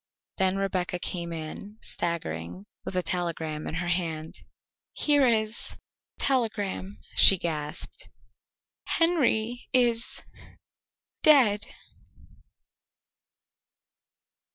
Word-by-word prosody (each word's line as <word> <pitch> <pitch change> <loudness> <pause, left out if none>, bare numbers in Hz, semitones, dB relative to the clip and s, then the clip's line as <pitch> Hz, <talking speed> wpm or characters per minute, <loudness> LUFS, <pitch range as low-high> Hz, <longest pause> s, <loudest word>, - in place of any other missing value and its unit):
Then 190 0 +2
Rebecca 195 -1 -1
came 175 -1 -4
in, 165 +6 -7
staggering, 90 - -4 0.2
with - - -5
a 180 - +1
telegram 165 -4 -3
in - - -4
her 175 +1 -2
hand. 165 -3 -1 0.6
"Here 290 -3 +4
is 220 -1 -1 0.4
a - - -33
telegram," 210 -6 0 0.2
she 195 - +8
gasped. 150 -4 -4 0.9
"Henry 245 -9 +1
is 240 -2 +1 1.0
dead." 240 -9 +5
190 Hz, 85 wpm, -27 LUFS, 165-230 Hz, 1.0 s, she